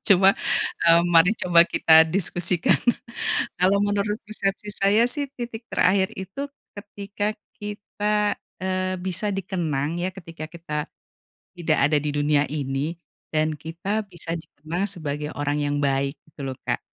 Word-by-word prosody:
cuma, 195 0 +6 0.5
mmm, 170 +1 +5
mari 165 +4 +7
coba 170 -2 +6
kita 160 -2 +6
diskusikan. 175 0 +3 0.8
Kalau 190 +3 +4
menurut 205 +1 0
persepsi 205 -1 -2
saya, 210 +4 +5
sih, 280 +2 +1
titik 235 -1 -5
terakhir 190 +1 +3
itu 195 +10 -5 0.2
ketika 205 0 -5 0.4
kita, 210 0 -1 0.2
eee, 185 0 -1
bisa 185 +3 -2
dikenang, 175 -5 -2
ya, 185 - 0
ketika 165 -4 -9
kita 150 -3 -5 0.6
tidak 165 -3 0
ada 150 +2 +4
di 150 - -2
dunia 145 0 +2
ini 145 +2 -2 0.4
dan 155 -1 0
kita 195 +7 -3
bisa 175 -3 -7
dikenang 165 +4 -4
sebagai 150 -4 -4
orang 145 0 -1
yang 145 0 0
baik 140 +1 +1 0.2
gitu 140 -2 -6
lho, 130 - -4
Kak. - - -1
175 Hz, 135 wpm, -24 LUFS, 155-200 Hz, 0.8 s, mari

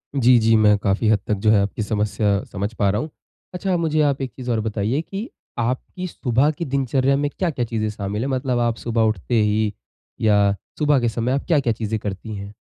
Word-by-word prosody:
जी, 125 -2 +5
जी। 115 0 +4
मैं 105 -1 +5
काफ़ी 100 +2 0
हद 105 -2 +4
तक 105 - +1
जो - - +6
है 100 -2 +5
आपकी 100 +2 -2
समस्या 105 -1 0
समझ 100 +3 -3
पा 100 -3 +1
रहा 105 - 0
हूँ। 155 - -5 0.4
अच्छा 185 0 -1
मुझे 155 -2 +1
आप 140 -2 +1
एक 130 - -3
चीज़ 125 -2 -4
और 115 - +1
बताइए 110 +6 -1
कि 200 - -6 0.3
आपकी 130 +10 -2
सुबह 135 -1 +1
की 165 +3 -5
दिनचर्या 135 0 +1
में 145 0 0
क्या-क्या 155 -10 -1
चीज़ें 110 -2 -2
शामिल 105 +1 -4
है? 135 - -1
मतलब 130 -2 0
आप 120 -1 +1
सुबह 115 -1 -1
उठते 110 +1 +1
ही 105 0 +1 0.5
या 100 -2 +4 0.2
सुबह 145 -2 +3
के 120 -1 +1
समय 115 +2 -1
आप 140 - -1
क्या-क्या 140 -9 +2
चीज़ें 110 0 -3
करती 100 +2 -5
हैं? 100 +1 -8
115 Hz, 215 wpm, -22 LUFS, 105-135 Hz, 0.5 s, जो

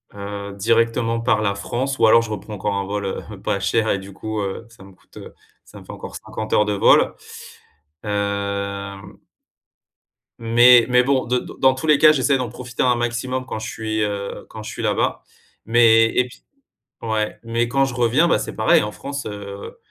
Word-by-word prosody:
heu, 100 0 -6
directement 115 +2 +1
par 110 -3 +1
la 100 -1 +1
France 130 +7 -3
ou - - +5
alors 115 +1 +6
je 110 - -7
reprends 105 +1 -6
encore 100 +1 -2
un 100 0 -2
vol, 100 0 -3
heu, 95 - -6
pas 100 - -1
cher 110 +3 0
et 100 - 0
du 95 +1 -11
coup, 110 +2 -4
heu, 100 +3 -5
ça 115 -4 -17
me 95 -1 -15
coûte, - - -21
heu, - - -11 0.3
ça - - -14
me - - -15
fait - - -10
encore - - -9
50 110 0 -7
heures 105 - +4
de 105 - -1
vol. 100 - +4 0.9
Hem 100 -1 -4 1.2
mais 120 +1 +6
mais 125 0 +5
bon, 135 0 +1
de 125 +1 0
dans 130 0 +1
tous 130 +5 -5
les 150 - +5
cas, 155 +1 +7
j'essaie 135 -1 +2
d'en 125 -3 -3
profiter 125 +1 -4
un 125 -1 +3
maximum 120 +2 -2
quand 115 - -5
je 110 +1 -5
suis, 110 -1 -3
heu, 100 -1 -4
quand - - -9
je - - -7
suis - - -6
là-bas. - - 0 0.4
Mais 115 -1 +5
et 125 0 +2
puis - - -17 0.6
ouais, 110 -1 -2
mais 115 +1 -1
quand 135 +2 +2
je 135 - -5
reviens, 125 +8 +2
bah, - - +2
c'est - - -6
pareil, 110 - +4
en 105 - -3
France, 140 +8 -6
heu 100 -1 -8
110 Hz, 200 wpm, -21 LUFS, 100-125 Hz, 1.2 s, cas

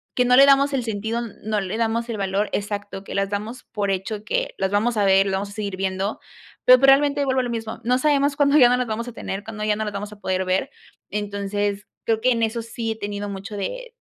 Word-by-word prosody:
que 250 - +3
no 250 0 +5
le 275 +1 +9
damos 280 0 +4
el 255 -3 0
sentido, 220 +1 -2 0.2
no 215 -1 0
le 195 +3 -4
damos 230 +1 -1
el 220 - -3
valor 195 +1 -1
Exacto, 205 -1 -4
que - - -7
las 195 0 0
damos 215 +5 -5
por 205 -2 -1
hecho 205 +3 -3
que, - - -1
las 190 - 0
vamos 215 +3 +1
a 205 - +3
ver, 195 0 +5
lo - - -1
vamos 200 +1 -2
a - - -12
seguir 200 -3 -4
viendo, 190 +2 -2 0.5
pero 255 0 +9
pues 270 +1 +4
realmente 285 +1 +5
vuelvo 260 -1 +1
a - - +1
lo 245 - -3
mismo, 225 -1 -4
no 250 +1 +3
sabemos 285 -1 +2
cuándo 285 +1 +4
ya 245 -4 +8
no 250 - +4
las 250 - 0
vamos 230 +2 -3
a 240 - -7
tener, 200 -2 -5
cuando 215 -1 -6
ya 210 -1 +1
no 220 - -2
las 210 - -4
vamos 205 +1 -5
a 210 - -12
poder 185 -1 -1
ver, 185 +1 0 0.4
entonces 205 0 -2 0.2
creo 225 -1 +1
que 255 +2 +3
en 230 -1 +1
eso 225 +1 -1
sí 230 0 -4
he - - -3
tenido 205 0 -4
mucho 200 +1 -7
de - - -5
215 Hz, 260 wpm, -23 LUFS, 200-250 Hz, 0.5 s, le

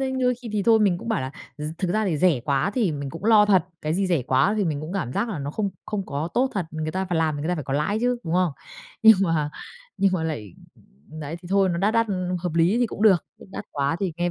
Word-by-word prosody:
đấy, 265 -1 -1
đôi 250 0 +2
khi 240 -1 -10
thì 205 -2 0
thôi 225 +1 +5
mình 185 -4 +3
cũng 230 - -8
bảo 220 - 0
là 130 0 -4 0.3
r - - -6 0.2
thực 185 -3 -1
ra 215 +2 +1
thì 165 -5 0
rẻ 165 -8 +3
quá 140 +8 0
thì 215 -10 +1
mình 140 -2 -5
cũng 165 +5 -9
lo 215 -2 +6
thật, 190 -4 +4 0.2
cái 155 +1 -1
gì 195 +1 +1
rẻ 170 -7 +1
quá 130 - +2
thì 205 - +1
mình 150 -3 -1
cũng 155 +4 -6
cảm 175 -11 -3
giác 235 - -1
là 190 -9 -4
nó 140 0 -4
không 200 +4 -2 0.2
không 200 -3 -3
có 145 +4 -3
tốt 260 +2 +2
thật, 185 -5 -1
người 155 0 -3
ta 190 +2 -2
phải 175 -2 -1
làm 155 -2 +1
thì 145 - -5
người 155 - -3
ta 180 - +1
phải 150 - -5
có 135 - -4
lãi 175 +9 0
chứ, 245 +1 +1
đúng 165 +1 -2
không? 180 -4 +2 0.5
Nhưng 220 -2 +9
mà 160 -5 0 0.5
nhưng 195 -1 +2
mà 180 - 0
lại 110 - -5 0.7
đấy, 150 +3 -5
thì 175 - -10
thôi, 195 -1 +3
nó 170 -1 -1
đắt 210 +4 +1
đắt 230 0 +3 0.4
hợp 175 -3 -3
lý 170 +7 +3
thì 245 - +3
cũng 210 - -6
được, 195 -6 +5
chứ - - -13
đắt - - -6
quá 140 +3 0
thì 190 -4 -1
nghe 175 0 0
180 Hz, 295 wpm, -24 LUFS, 155-210 Hz, 0.7 s, Nhưng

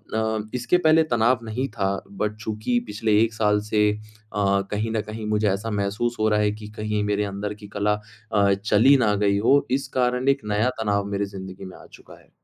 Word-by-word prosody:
न 110 -1 -1
इसके 125 +8 +2
पहले 160 -1 +4
तनाव 120 +2 +3
नहीं 125 +5 -2
था, 100 -3 -1 0.2
बट 105 +2 -2
चूँकि 110 +3 -1
पिछले 105 0 +1
1 115 -1 +1
साल 105 -1 +2
से 105 -1 +3
अ, - - -7 0.7
कहीं 110 +2 -1
न 110 -1 0
कहीं 110 0 -6
मुझे 105 0 +1
ऐसा 105 +4 -2
महसूस 110 +5 -1
हो 110 0 +3
रहा 105 0 +2
है 105 0 +2
कि 105 - -7
कहीं 105 -1 -1
मेरे 105 0 0
अंदर 100 +1 -4
की 105 - -8
कला 105 +1 +2 0.4
अ, 100 -2 +3
चली 110 +7 +4
ना 110 -5 +2
गई 100 0 +3
हो। 135 +7 +3
इस 135 +1 0
कारण 125 +1 +1
एक 140 0 +2
नया 110 +4 +2
तनाव 100 -2 0
मेरी 100 0 0
ज़िंदगी 95 0 -8
में 95 - -10
आ - - -15
चुका - - -16
है। - - -26
105 Hz, 210 wpm, -24 LUFS, 105-115 Hz, 0.7 s, पहले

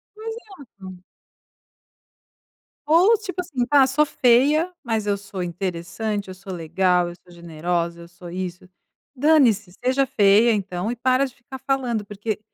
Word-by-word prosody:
Exato. 290 - -10 1.9
Ou 375 +8 +5
tipo 375 -3 -5
assim, 280 -9 -2
tá 280 +1 +5
sou 275 +3 +2
feia, 290 +7 +3
mas 225 -4 -2
eu 205 -1 0
sou 195 -2 -6
interessante, 190 +3 -4
eu - - -6
sou 190 0 -9
legal, 175 +1 +1
eu 175 - -10
sou 175 - -19
generosa, 170 0 -3
eu 170 - -11
sou 175 0 -12
isso. 180 -1 -5 0.5
Dane-se, 250 - +3
seja 260 +2 +2
feia 220 -1 +4
então 190 -1 -3
e 245 - -2
para 255 +3 +2
de 260 - -10
ficar 265 +2 -11
falando, 255 -5 -1
porque 205 +1 -4
215 Hz, 145 wpm, -22 LUFS, 180-270 Hz, 1.9 s, Ou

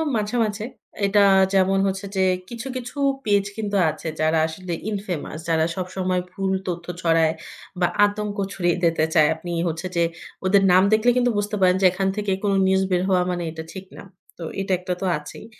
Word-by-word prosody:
মাঝে, 210 +2 -1
মাঝে 210 0 -3 0.4
এটা 200 +1 +4 0.3
যেমন 195 0 +3
হচ্ছে 195 +1 -3
যে 190 - +1 0.3
কিছু, 235 +2 -6
কিছু 250 +2 -6 0.3
পেজ 200 -2 +2
কিন্তু 205 -2 -3
আছে 160 - -6
যারা 155 +1 +2
আসলে 175 +2 -6 0.2
ইনফেমাস 190 -7 -4
যারা 160 -1 +3
সবসময় 185 0 -2
ভুল 190 0 -2
তথ্য 170 -1 -4 0.2
ছড়ায় 165 -1 +3 0.5
বা 175 - +3 0.2
আতঙ্ক 205 0 -3 0.2
ছড়িয়ে 175 -2 0
দিতে 165 -2 +3
চায়। 155 -3 +5
আপনি 175 +2 -7 0.2
হচ্ছে 165 +3 -3
যে 170 - +3 0.4
ওদের 195 +1 +4
নাম 185 +1 +6
দেখলে 220 +3 +4
কিন্তু 245 -1 +3
বুঝতে 205 +1 -1
পারেন 180 -1 +5
যে - - +4
এখান 190 +1 -1
থেকে 205 -2 -1
কোন 200 -1 +2
নিউজ 190 0 +3
বের 180 -1 +2
হওয়া 185 -1 +3
মানে 175 -1 -3
এটা 160 0 -7
ঠিক 190 0 -8
না। - - -9 0.4
তো - - -6 0.2
এটা 195 -1 -1
একটা 180 0 -3
তো - - -1
আছেই। 150 +7 -10
190 Hz, 190 wpm, -23 LUFS, 175-205 Hz, 0.5 s, নাম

